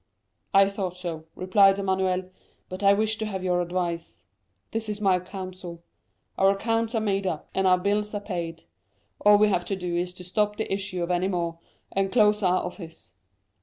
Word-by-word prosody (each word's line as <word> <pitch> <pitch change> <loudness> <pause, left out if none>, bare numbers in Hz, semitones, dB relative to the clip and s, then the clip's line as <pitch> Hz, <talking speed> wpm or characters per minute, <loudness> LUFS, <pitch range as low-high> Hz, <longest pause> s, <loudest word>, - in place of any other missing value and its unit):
"'I 195 0 +7
thought 190 -3 -4
so,' 165 -3 -5
replied 195 +1 +4
Emmanuel; 190 -1 0 0.4
'but 185 +1 -6
I 200 0 +6
wished 220 +2 +1
to 220 - -2
have 190 -3 -4
your 180 -1 +1
advice.' 175 -1 -3 0.5
"'This 225 -1 -3
is 210 0 -3
my 190 -3 +3
counsel:—Our 185 0 -5
accounts 225 +3 0
are - - +3
made 200 -2 0
up 160 -4 -4
and 190 0 +2
our 185 0 +5
bills 205 +3 -1
paid; 170 -4 -4 0.6
all 210 0 +7
we 210 0 +4
have 175 -3 0
to 195 - -1
do 180 -2 -3
is 175 +1 -1
to 180 - -9
stop 210 +3 0
the 220 - -2
issue 190 -2 -2
of 170 - -2
any 180 +1 +1
more, 170 -3 -2 0.3
and 195 0 0
close 210 -3 +4
our 185 -2 +2
office. 170 - -9
190 Hz, 180 wpm, -26 LUFS, 180-205 Hz, 0.6 s, I